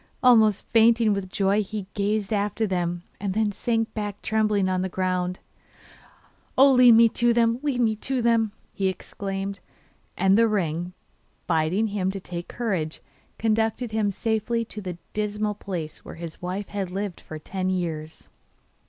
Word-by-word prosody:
Almost 220 -5 +5
fainting 230 -1 +5
with 195 -2 -3
joy 200 +2 +2
he 210 -1 -5
gazed 205 +1 -1
after 210 +2 0
them, 175 -3 -2 0.2
and 195 -1 -2
then 215 -1 +2
sank 225 +2 -1
back 205 -2 -4
trembling 215 -3 +1
on 185 -1 0
the 190 - -2
ground. 180 0 -1 1.2
'Oh, 275 +1 +7
lead 250 -2 +8
me 230 +1 +7
to 240 +1 +2
them, 230 0 +2
lead 280 -4 0
me 220 -2 +2
to 260 +4 -1
them!' 230 -2 +2 0.2
he 195 - 0
exclaimed. 195 +1 -4 0.6
And 190 +1 +4
the 230 - +5
ring, 175 -4 -1 0.5
bidding 165 +5 +1
him 195 -2 -1
take 180 -3 -5
courage, 185 -10 -2 0.4
conducted 225 +1 0
him 215 -2 +1
safely 225 +3 -1
to 210 - -8
the 180 -3 -5 0.2
dismal 210 0 -1
place 180 -6 -6
where - - -9
his 165 -1 -8
wife 185 +3 -4
had 200 -3 -3
lived 195 0 -4
for 155 - -8
ten 185 +4 -3
years. 160 -4 -4
205 Hz, 155 wpm, -25 LUFS, 185-220 Hz, 1.2 s, lead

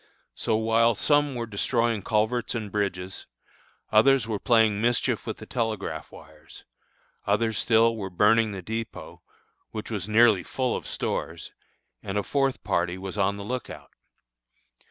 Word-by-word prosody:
So 110 - -1
while 115 +1 +3
some 145 0 +2
were 120 -1 -3
destroying 115 +1 0
culverts 110 +4 0
and 110 -4 -4
bridges, 95 -2 -3 0.6
others 120 +2 +4
were 110 -3 -2
playing 110 -4 +3
mischief 120 0 0
with - - -3
the - - -10
telegraph 110 -5 -3
wires; 80 0 -15 0.6
others 110 -2 +1
still 115 0 +3
were 100 -3 -5
burning 105 +4 +3
the 95 -2 -7
dépôt, 110 +3 -6 0.5
which 110 +1 -7
was 105 -2 -3
nearly 110 -3 +5
full 130 +7 -2
of - - -6
stores, - - -4 0.5
and 100 +1 -4
a 105 - 0
fourth 135 +1 0
party 90 +1 0
was 95 +1 -6
on 100 0 +1
the 100 - -6
lookout. 125 +3 -6
110 Hz, 145 wpm, -26 LUFS, 100-115 Hz, 0.6 s, nearly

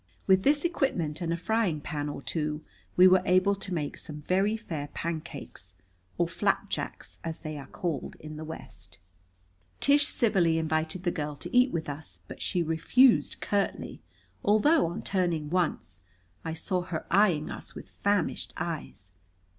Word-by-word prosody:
With 190 0 +5
this 290 - +3
equipment 185 - 0
and 170 -1 -1
a 170 - 0
frying 190 -3 +1
pan 145 0 -3
or 145 - -6
two 150 -1 -2 0.3
we 180 +1 +9
were 185 0 +6
able 185 +2 +4
to 195 -1 -5
make 155 -5 -2
some 150 -1 -9
very 195 +6 +2
fair 160 -10 -5
pancakes 155 - -6 0.4
or - - +2
flapjacks, - - -2
as 165 0 -5
they 155 -2 -5
are 140 -2 -8
called 165 -4 -3
in 155 0 -8
the 155 - -6
West. 100 - -9 0.8
Tish 285 +1 +5
civilly 185 -9 +2
invited 160 +2 -1
the 175 - +1
girl 150 -3 -3
to 145 - -6
eat 250 +1 +6
with 165 -2 -2
us, 145 +2 -7
but - - -9
she 180 -3 0
refused 225 +11 +4
curtly, 200 -1 -1 0.4
although, 215 - +4
on 170 - -5
turning 170 -6 0
once, 170 - -1 0.4
I 160 - -3
saw 180 +2 -1
her 175 -3 -4
eyeing 175 -5 +3
us - - -7
with - - -9
famished 200 -4 -1
eyes. 160 - -5
170 Hz, 160 wpm, -29 LUFS, 155-195 Hz, 0.8 s, we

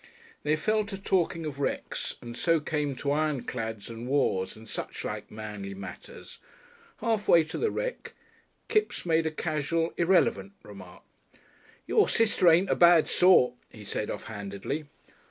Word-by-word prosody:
They 150 +1 +1
fell 215 +7 +1
to 200 -1 -6
talking 175 -4 0
of 145 -2 -5
wrecks, 140 - -3
and 120 0 -7
so 165 +5 +2
came 150 -2 -2
to 140 +2 -2
ironclads 125 -8 -2
and 115 +1 -7
wars 110 -9 0
and 110 0 -14
suchlike - - -5
manly 105 -2 -7
matters. 95 -1 -10 0.6
Half 220 -3 0
way 165 -1 +6
to 155 - -6
the 450 - +1
wreck - - -4 0.5
Kipps 430 - 0
made 165 -1 +2
a - - -1
casual 160 +1 -1
irrelevant 165 - +2
remark. 100 -4 -12 0.8
"Your - - +3
sister 220 -5 +2
ain't 175 +4 +4
a - - +3
bad 170 -2 +6
sort," 180 -9 +5 0.2
he 110 - -12
said 105 +1 -3
off - - -5
handedly. 100 +8 -5
150 Hz, 150 wpm, -28 LUFS, 110-170 Hz, 0.8 s, way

